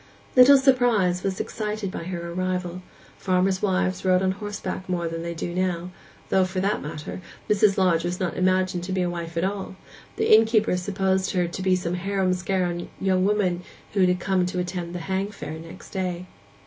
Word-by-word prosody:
Little 260 +2 +9
surprise 245 -9 +3
was 190 -1 -2
excited 210 -2 -3
by 170 - -6
her 170 -1 -5
arrival; 180 0 -2 0.4
farmers' 185 0 +1
wives 185 -2 0
rode 185 0 +3
on 190 - +2
horseback 200 -1 -5
then 180 - 0
more 170 -1 -2
than 165 0 -4
they 170 0 -4
do 170 +1 -4
now; 180 -1 -1 0.4
though, 190 - +4
for 185 0 -2
that 200 +3 0
matter, 150 +4 -6 0.3
Mrs. 210 -1 +3
Lodge 175 -4 +3
was 175 +1 -2
not 185 -3 -2
imagined 185 -1 +1
to 190 - -5
be 185 -1 +1
a 175 - 0
wife 170 -1 -6
at 170 - +1
all; 195 0 -3 0.4
the - - +5
innkeeper 220 -2 +3
supposed 190 0 0
her 180 -2 +1 0.3
some 180 -1 -2
harum 190 0 0
skarum 180 -1 -1
young 185 -1 +2
woman 195 -4 +1 0.3
who 195 -2 +3
had 180 0 +3
come 185 -1 +1
to 180 - -4
attend 175 -1 -3
'hang 190 +3 -2
fair' 160 -6 -7
next 165 +1 -11
day. 185 -2 -3
185 Hz, 185 wpm, -25 LUFS, 175-195 Hz, 0.4 s, Little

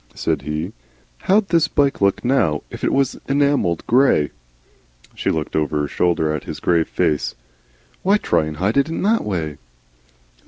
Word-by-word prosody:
said - - -1
he. 75 +2 -4 0.5
"How'd 200 +1 +2
this 165 -2 +3
bike 140 -5 +1
look, 100 +4 +1
now, 100 - +1
if - - -9
it - - +2
was 135 -2 0
enamelled 140 - +1
grey?" 120 - +3 0.8
She - - -2
looked 80 -2 -2
over 75 -1 0
her 75 - -1
shoulder 80 -1 +1
at 75 - -6
his - - -6
grave 85 -2 +2
face. 75 - 0 0.7
"Why 200 +3 +3
try 80 - +1
and 75 -1 -6
hide 100 - 0
it 140 +3 +2
in 165 - -3
that 225 +3 +2
way?" 80 -7 -3
95 Hz, 165 wpm, -20 LUFS, -, 0.8 s, this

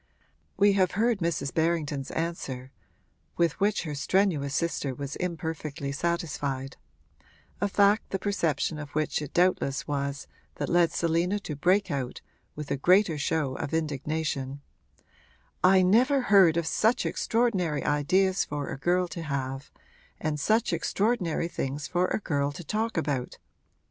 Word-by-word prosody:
We 200 +1 +5
have 185 -3 +2
heard 225 +1 +1
Mrs. 165 -5 -1
Berrington's 155 -4 0
answer, 135 -6 -4 0.7
with 170 0 +1
which 205 0 +1
her 155 -3 -4
strenuous 145 -3 +1
sister 150 -5 -1
was 140 +1 -5
imperfectly 160 -4 -4
satisfied; 145 -4 -2 0.9
a 205 - +2
fact 205 +1 +3
the 195 - -1
perception 165 -6 -1
of 150 -1 -7
which 155 0 0
it 150 0 -6
doubtless 175 -6 +1
was 140 -1 -2 0.3
that - - -3
led 175 -1 +4
Selina 170 +4 +1
to 150 - -5
break 185 +6 +2
out, 130 -3 -3 0.3
with 150 -2 -6
a 140 - +1
greater 180 +1 +3
show 145 -2 0
of 155 - -3
indignation: 150 -2 -2 1.0
'I 185 0 +6
never 250 +9 +4
heard 195 -8 +5
of 170 - 0
such 220 +8 +2
extraordinary 195 -10 0
ideas 185 +7 +2
for 145 -1 -4
a - - -6
girl 180 +4 +1
to 170 - -6
have, 135 -3 -4 0.5
and 155 -1 -2
such 220 +9 +2
extraordinary 195 -7 0
things 145 -3 -4
for 180 +1 +1
a - - 0
girl 145 -8 -1
to 175 - -8
talk 220 +5 -2
about! 140 -5 -2
165 Hz, 145 wpm, -27 LUFS, 145-190 Hz, 1.0 s, I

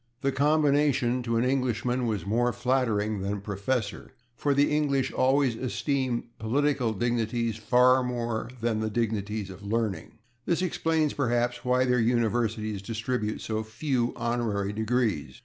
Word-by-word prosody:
The 140 -1 +1
combination, 140 -3 +2
to 115 -1 -1
an 115 - +2
Englishman, 125 -1 0
was 105 -4 -2
more 120 +4 +1
flattering 110 -5 0
than 100 +1 -2
/Professor/, 105 +3 -3 0.3
for 140 +1 0
the 145 +1 +3
English 140 -3 +1
always 130 -2 +2
esteem 130 0 -1 0.2
political 130 +1 +1
dignities 115 0 -1
far 125 +3 +4
more 120 -3 -2
than 115 -2 0
the 110 0 -1
dignities 105 -2 -2
of 95 +1 -11
learning. 105 -4 -2 0.3
This 175 +2 +1
explains, 160 -3 0
perhaps, 120 -2 0
why 125 0 +2
their 125 0 +2
universities 110 -3 0
distribute 110 +1 -3
so 110 0 -2
few 120 +2 -1
honorary 115 -4 -1
degrees. 110 - -1
120 Hz, 135 wpm, -27 LUFS, 110-130 Hz, 0.3 s, far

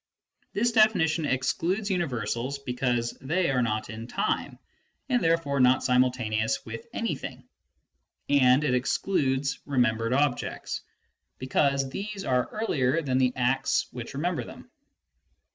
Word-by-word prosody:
This 235 +4 +1
definition 175 -9 +3
excludes 180 +10 0
universals, 130 - -2
be 135 -3 -5
cause 120 -2 -1
they 165 +3 +1
are 130 -2 +2
not 110 -2 -1
in 110 +1 -7
time - - -2 0.5
and 245 -2 +2
therefore 165 -4 +1
not 125 0 +4
simultaneous 125 -4 +1
with 115 0 -8
anything; 230 -1 -4 0.8
and 135 0 +4
it 150 - +1
excludes 135 0 0
remembered 115 -4 +1
objects, 140 -2 -1 0.6
because 135 +1 +1
these 200 +3 -5
are 125 -2 +1
earlier 165 - 0
than 130 -2 +1
the 125 -1 +2
acts 130 +1 +1
which 120 +2 -7
remember 170 +4 -1
them. - - -12
135 Hz, 125 wpm, -27 LUFS, 125-165 Hz, 0.8 s, not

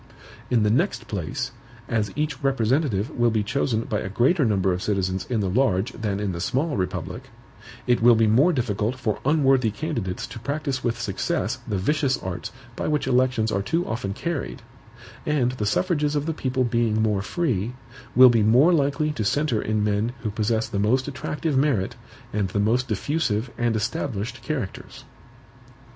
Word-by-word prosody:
In 120 -4 +3
the 105 - +3
next 120 -1 0
place, 105 - -3 0.4
as 105 -4 -1
each 150 -2 -2
representative 130 -4 +1
will 120 0 +2
be 110 -2 0
chosen 115 0 0
by 105 -2 -2
a 100 - -4
greater 135 - +2
number 95 -5 +2
of 90 - -3
citizens 95 -2 -1
in 115 -4 0
the 100 - 0
large 110 +1 +1
than 105 -5 -3
in 105 -2 -1
the 85 - -5
small 145 - 0
republic, 90 -4 -4 0.6
it 120 -2 +2
will 120 0 +7
be 115 0 +3
more 125 +11 +4
difficult 115 - -1
for 115 -5 -2
unworthy 135 -5 +3
candidates 110 - -3
to 120 - -9
practice 140 +1 -3
with 115 -1 -1
success 100 -2 -2
the 100 - -1
vicious 140 - +1
arts 90 -1 -5 0.2
by - - -3
which 150 -2 0
elections 125 -3 +2
are 100 - 0
too 165 - 0
often 110 -3 -3
carried; 160 -5 -4 0.6
and 140 -5 +1
the 110 -5 -3
suffrages 150 - +1
of 145 0 0
the 165 - -1
people 130 -3 -1
being 115 -2 +1
more 105 -3 +1
free, 120 - -1 0.4
will 130 0 +9
be 115 -2 +3
more 125 +11 +5
likely 150 0 +1
to 130 -7 -3
centre 125 +1 +1
in 110 0 0
men 105 +3 0
who 110 - -1
possess 110 +2 0
the 100 - -3
most 125 +6 +2
attractive 145 +2 -3
merit 130 -8 +1 0.4
and 105 -2 0
the 100 - -1
most 120 +5 +2
diffusive 130 -8 -1
and 120 -1 0
established 110 +2 -3
characters. 135 -11 -5
120 Hz, 175 wpm, -24 LUFS, 105-135 Hz, 0.6 s, will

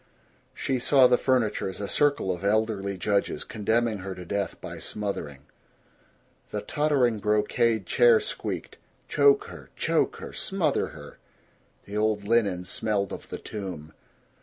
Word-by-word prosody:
She 130 -1 -1
saw 130 +1 +5
the 125 0 +6
furniture 120 -7 +1
as 95 - -8
a 100 - -3
circle 145 -6 +2
of 90 +1 -8
elderly 100 -2 0
judges, 100 +2 0
condemning 110 0 0
her 95 0 -6
to 90 - -9
death 100 +2 -3
by - - -8
smothering. 90 -10 -4 1.1
The 105 - -3
tottering 135 -3 +1
brocade 105 +1 +1
chair 480 -2 +5
squeaked, - - -5 0.3
"Choke 420 0 +4
her 465 - -11
choke - - +1
her - - -9
smother 175 -8 0
her." - - -12 0.7
The 100 +1 -5
old 105 -1 +1
linen 105 -6 +2
smelled 100 +2 -1
of - - -8
the - - -5
tomb. 90 -7 -7
105 Hz, 140 wpm, -27 LUFS, 100-125 Hz, 1.1 s, the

